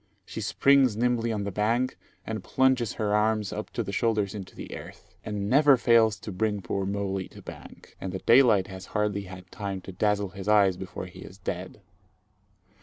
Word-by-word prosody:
She -, -, -6 dB
springs 135 Hz, -5 st, +3 dB
nimbly 120 Hz, -1 st, +1 dB
on 105 Hz, -2 st, -2 dB
the 100 Hz, -, -3 dB
bank, 115 Hz, +6 st, 0 dB, 0.3 s
and -, -, -4 dB
plunges 130 Hz, -3 st, +2 dB
her 105 Hz, -2 st, -1 dB
arms 105 Hz, -1 st, +1 dB
up -, -, -5 dB
to -, -, -1 dB
the -, -, -5 dB
shoulders 105 Hz, -4 st, 0 dB
into 95 Hz, -3 st, -8 dB
the -, -, -7 dB
earth, -, -, -12 dB
and 105 Hz, -1 st, -3 dB
never 140 Hz, +3 st, +6 dB
fails 115 Hz, -3 st, +4 dB
to 105 Hz, -, -6 dB
bring 105 Hz, +1 st, -1 dB
poor 95 Hz, +2 st, -2 dB
molie 100 Hz, -1 st, -2 dB
to -, -, -14 dB
bank; -, -, -12 dB
and 95 Hz, -, -4 dB
the 95 Hz, -, -3 dB
daylight 115 Hz, -3 st, +5 dB
has 95 Hz, -1 st, -9 dB
hardly 105 Hz, -1 st, 0 dB
had 90 Hz, -1 st, -11 dB
time 100 Hz, -2 st, -4 dB
to 95 Hz, -, -9 dB
dazzle 105 Hz, +1 st, 0 dB
his 95 Hz, +1 st, -9 dB
eyes 100 Hz, -3 st, +5 dB
before 95 Hz, 0 st, -7 dB
he 90 Hz, -, -12 dB
is 95 Hz, -, -11 dB
dead. 95 Hz, +1 st, -6 dB
105 Hz, 190 wpm, -27 LUFS, 95-115 Hz, 0.3 s, never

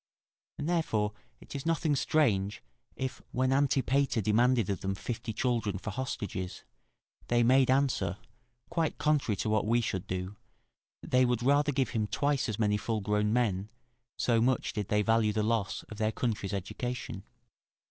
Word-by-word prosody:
And 145 Hz, -, -3 dB
therefore 110 Hz, -12 st, 0 dB, 0.3 s
it -, -, -11 dB
is 140 Hz, -, -4 dB
nothing 160 Hz, -2 st, +1 dB
strange 105 Hz, -, +1 dB, 0.3 s
if, 130 Hz, -1 st, -4 dB
when 130 Hz, +1 st, +1 dB
Antipater 135 Hz, -2 st, +2 dB
demanded 115 Hz, +2 st, +3 dB
of 100 Hz, -, -2 dB
them 95 Hz, 0 st, -1 dB
fifty 115 Hz, +4 st, -4 dB
children 115 Hz, -3 st, 0 dB
for 100 Hz, +3 st, -5 dB
hostages, 100 Hz, -7 st, -4 dB, 0.6 s
they 120 Hz, 0 st, +3 dB
made 130 Hz, +2 st, +5 dB
answer, 130 Hz, -9 st, +1 dB, 0.5 s
quite 165 Hz, -2 st, 0 dB
contrary 150 Hz, -8 st, +1 dB
to 110 Hz, -, -2 dB
what 110 Hz, -1 st, +1 dB
we 120 Hz, +2 st, +3 dB
should 95 Hz, -5 st, -2 dB
do, 95 Hz, +2 st, -4 dB, 0.7 s
that -, -, -10 dB
they 130 Hz, 0 st, +5 dB
would 120 Hz, -1 st, +1 dB
rather 145 Hz, +3 st, +3 dB
give 130 Hz, -3 st, 0 dB
him 110 Hz, -3 st, -1 dB
twice 140 Hz, +1 st, 0 dB
as 105 Hz, -, -2 dB
many 105 Hz, -2 st, +2 dB
full 110 Hz, 0 st, -2 dB
grown 105 Hz, +1 st, +1 dB
men, 105 Hz, -4 st, +1 dB, 0.5 s
so 115 Hz, -2 st, +2 dB
much 125 Hz, +2 st, +1 dB
did 105 Hz, -3 st, -3 dB
they 105 Hz, 0 st, +2 dB
value 115 Hz, -1 st, +3 dB
the 105 Hz, 0 st, 0 dB
loss 110 Hz, -3 st, 0 dB
of 110 Hz, -, -11 dB
their 110 Hz, 0 st, +1 dB
country's 110 Hz, -4 st, -2 dB
education. 115 Hz, +6 st, -4 dB
115 Hz, 165 wpm, -30 LUFS, 105-130 Hz, 0.7 s, made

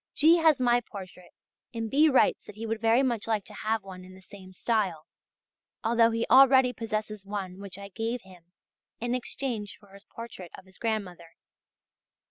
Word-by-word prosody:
G. 320 Hz, +3 st, +6 dB
has 320 Hz, -4 st, +4 dB
my 245 Hz, -1 st, +3 dB
portrait 185 Hz, -5 st, -11 dB, 0.5 s
and 225 Hz, -1 st, -2 dB
B. 300 Hz, +7 st, +4 dB
writes 265 Hz, -, +3 dB
that -, -, -10 dB
he 225 Hz, +2 st, -6 dB
would 225 Hz, 0 st, -3 dB
very 230 Hz, +3 st, +4 dB
much 235 Hz, -5 st, -1 dB
like 215 Hz, -3 st, -1 dB
to 210 Hz, -, -8 dB
have 215 Hz, 0 st, -2 dB
one 185 Hz, -1 st, -10 dB
in 185 Hz, 0 st, -13 dB
the 190 Hz, -, -15 dB
same 190 Hz, -1 st, -13 dB
style, 185 Hz, -6 st, -1 dB, 0.8 s
although 230 Hz, 0 st, +4 dB
he 230 Hz, 0 st, -1 dB
already 260 Hz, 0 st, +6 dB
possesses 215 Hz, -2 st, -4 dB
one 195 Hz, -2 st, -6 dB
which 195 Hz, -2 st, -9 dB
I 200 Hz, 0 st, -9 dB
gave 225 Hz, +4 st, -3 dB
him 180 Hz, -2 st, -18 dB, 0.5 s
in 240 Hz, +1 st, -2 dB
exchange 240 Hz, -4 st, -4 dB
for 200 Hz, -2 st, -21 dB
his 200 Hz, +1 st, -15 dB
portrait 230 Hz, -6 st, -9 dB
of -, -, -14 dB
his 190 Hz, 0 st, -17 dB
grandmother. 185 Hz, -7 st, -4 dB
220 Hz, 180 wpm, -28 LUFS, 190-235 Hz, 0.8 s, G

